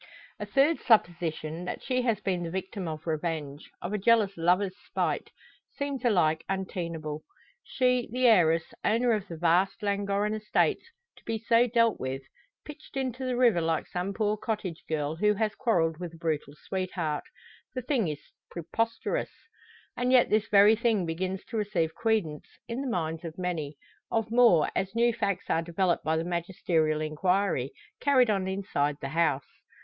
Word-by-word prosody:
A - - -5
third 290 +4 +3
supposition, 170 -6 +1
that - - -5
she 255 -1 0
has 230 -4 +1
been 190 -3 -1
the 170 - -3
victim 190 +1 -4
of 155 -1 -6
revenge 155 -3 -3
of 175 +4 -3
a 210 - 0
jealous 210 -2 +3
lover's 180 +3 +2
spite - - -2 0.5
seems 280 -3 -3
alike 170 -9 +2
untenable. 170 -5 -3 0.4
She, 250 -2 +1
the 255 +1 0
heiress, 165 -8 +4
owner 235 +3 +2
of 210 -3 0
the 165 - -7
vast 175 +5 +2
Llangorren 200 +1 0
estates, 215 -1 +1 0.4
to - - -19
be 225 0 -2
so 230 +2 +3
dealt 230 -1 +2
with 130 +1 -4 0.4
pitched 300 -2 -10
into 260 -1 -2
the 250 -1 -1
river 235 -9 +4
like 160 -1 0
some 180 +2 -3
poor 210 +1 0
cottage 205 -6 -4
girl, 155 0 -1
who 210 +3 +3
has 215 0 0
quarrelled 165 -11 +1
with 175 -2 -6
a - - -13
brutal 155 -3 -2
sweetheart! 180 -5 -2 0.5
The 255 - -3
thing 245 - +1
is 150 -1 -6 0.2
preposterous! 225 +7 -2 0.7
And 250 +1 0
yet 255 -2 +5
this 215 0 +2
very 205 +2 +6
thing 220 -5 +1
begins 185 +3 -3
to 230 - -3
receive 180 -7 0
credence 220 -10 -1 0.2
in 235 +3 -3
the 275 - -3
minds 165 -5 -2
of 165 -1 -7
many 165 -5 -3 0.3
of 225 -1 -1
more, 230 -10 +5
as 195 +2 -2
new 235 0 +3
facts 200 -4 -2
are 165 - +2
developed 170 +1 0
by 160 +1 +1
the 160 - 0
magisterial 170 -3 0
enquiry, 155 -2 0 0.3
carried 255 -5 +4
on 195 -2 0
inside 190 -7 -1
the 135 - -5
house. 150 -4 +1
190 Hz, 165 wpm, -28 LUFS, 165-225 Hz, 0.7 s, very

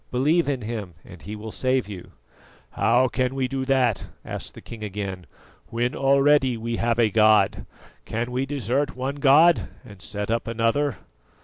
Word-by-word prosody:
"Believe 150 +6 +2
in 130 -4 -2
Him 105 -6 -5
and 90 -2 -13
He 105 +5 -7
will 110 +1 -8
save 130 -1 0
you." 95 -4 -10 0.6
"How 125 +3 +3
can 130 +1 -1
we 130 -1 0
do 135 0 -3
that," 130 -6 +1 0.2
asked - - -6
the - - -9
king 115 -2 -9
again, 95 -3 -5 0.4
"when 120 +3 -1
already 135 -2 +3
we 115 +1 -3
have 115 0 0
a 115 -3 +3
god? 110 -2 +3 0.4
Can 115 +2 -3
we 130 +2 -1
desert 140 0 -1
one 135 +2 -3
god 150 +5 +5 0.2
and 100 -3 -13
set 105 +2 -4
up 115 0 -1
another?" 115 +5 0
120 Hz, 170 wpm, -24 LUFS, 110-135 Hz, 0.6 s, god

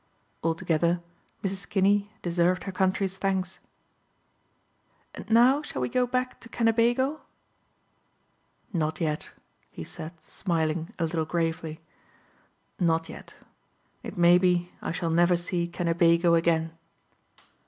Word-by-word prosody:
Altogether 170 +1 +1 0.4
Mrs. 195 0 -4
Kinney 200 +1 +2
deserved 175 +1 +1
her 195 - -4
country's 190 0 0
thanks. 190 -1 -1 1.5
"And - - -10
now 245 +5 +5
shall 295 - -6
we 125 -1 -1
go 250 -1 +1
back 255 +1 -2
to 230 - -13
Kennebago?" 240 +6 +2 1.5
"Not 160 -3 -1
yet," 155 -3 -2 0.3
he - - -8
said 165 - -8
smiling 165 -2 -2
a - - -1
little 160 -1 -1
gravely. 165 -1 -2 1.0
"Not 165 -2 +1
yet. - - -10 0.7
It - - -8
may 175 +1 +6
be 180 -1 +1
I - - -3
shall 170 -1 -2
never 175 +2 +4
see 175 0 -2
Kennebago 170 0 +3
again." 165 -1 +2
175 Hz, 115 wpm, -27 LUFS, 165-195 Hz, 1.5 s, may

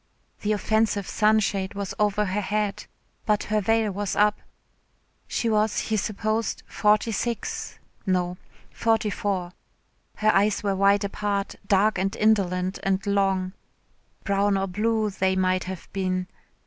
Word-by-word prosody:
The 210 - 0
offensive 215 -1 +1
sunshade 210 -3 +1
was 200 -1 -4
over 210 0 +2
her 200 +2 -1
head, 210 0 -2 0.4
but 210 -1 +2
her 215 0 0
veil 225 +1 +2
was 200 0 -3
up. 210 0 +3 0.9
She 235 - -1
was, 215 -1 +2
he 220 - 0
supposed, 215 +2 -1
forty 210 +2 +2
six 230 +1 -3 0.3
no, 180 -2 0 0.3
forty 225 -2 +1
four. 185 -3 -2 0.6
Her 215 0 +3
eyes 205 +1 +2
were 200 -1 +1
wide 200 +1 +4
apart, 200 0 -2
dark 200 0 +3
and 195 +2 -1
indolent 190 -4 +1
and 195 +1 0
long 195 -2 +1 0.7
brown 200 0 +2
or 195 - 0
blue 215 +3 0
they 190 -1 +1
might 185 -1 +1
have 185 -2 -7
been. 185 -1 -1
200 Hz, 135 wpm, -25 LUFS, 190-215 Hz, 0.9 s, wide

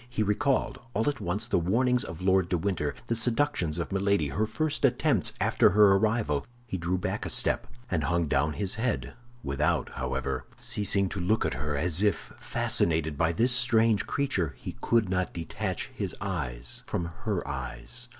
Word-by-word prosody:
He 115 -3 -1
recalled, 135 +5 0 0.2
all 110 +5 +1
at 145 - -1
once, 100 +6 -1
the 120 - +2
warnings 125 +8 +2
of 80 +2 -8
Lord 95 -1 +3
de 90 - +1
Winter, 80 -5 -1
the - - -1
seductions 115 - 0
of 85 - -3
Milady, 100 -5 +1
her 105 +10 -1
first 150 +7 -1
attempts - - +3
after - - +4
her 105 +1 +6
arrival. 105 -8 +1 0.2
He 110 - -5
drew 90 +1 -1
back 90 - -3
a - - -3
step, - - +3 0.2
and 80 -5 0
hung 85 +1 +1
down 70 +2 +1
his 100 +1 0
head, 125 -2 -1 0.3
without, 70 0 0
however, 65 -1 -3
ceasing 100 -1 +1
to 95 - -5
look 105 +5 +1
at - - 0
her, 75 -1 -3
as 85 +3 +2
if, 105 -1 0
fascinated 80 -2 +1
by 80 +3 +2
this 115 +9 +2
strange 115 -4 +3
creature, 95 - -1
he - - -7
could 115 -3 +2
not 90 0 -1
detach 85 -1 -3
his - - -4
eyes 75 -12 -4
from 85 - -2 0.2
her 100 -8 -1
eyes. 65 - -4
95 Hz, 180 wpm, -28 LUFS, 80-110 Hz, 0.3 s, her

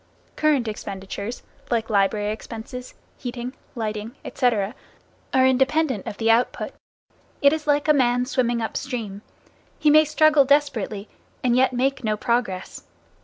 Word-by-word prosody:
Current 295 -6 +2
expenditures, 200 +1 -6 0.3
like 230 -2 0
library 205 0 +1
expenses, 230 +3 -8 0.2
heating, 245 0 -5 0.2
lighting, 215 +1 -4
etc., 225 -5 0 0.6
are 260 0 +4
independent 265 -2 +2
of 205 - -5
the 225 0 +3
output. 235 +2 +1 0.7
It 280 +1 +5
is 315 -1 -4
like 290 +1 +2
a 305 - +6
man 250 -3 +2
swimming 240 -3 0
up 220 - -4
stream. 225 -7 -5 0.6
He 300 - +4
may 310 +1 +7
struggle 305 -1 +5
desperately, 265 -8 +1 0.4
and 245 -1 +3
yet 255 +1 +4
make 265 +2 0
no 215 -1 0
progress. 220 -6 -2
245 Hz, 135 wpm, -23 LUFS, 215-275 Hz, 0.7 s, may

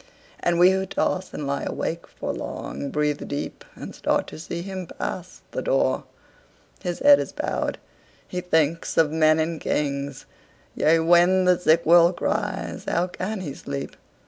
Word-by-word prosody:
And 175 -1 +1
we 180 +2 +7
who 190 0 0
toss 185 0 -1
and 150 - -5
lie 140 0 -1
awake 170 +1 -3
for - - -5
long, 140 - -5
Breathe 150 0 -1
deep, 145 - -5
and - - -8
start, - - 0
to - - -10
see 170 +1 -5
him 190 -2 -6
pass 180 +2 -6
the - - -3
door. - - +1 0.8
His 175 -2 -3
head 285 0 +7
is - - -3
bowed. - - -2 0.5
He 180 - -4
thinks 160 -2 0
of 155 -2 +4
men 155 0 +4
and 160 0 -1
kings. 140 -1 -2 0.5
Yea, 160 +1 +3
when 175 +3 +5
the 180 -1 +4
sick 170 -1 +3
world 170 +1 +6
cries, 205 -2 -2
how 175 - +1
can 185 +3 -4
he 145 -7 -5
sleep? 140 0 -6
170 Hz, 165 wpm, -24 LUFS, 155-185 Hz, 0.8 s, we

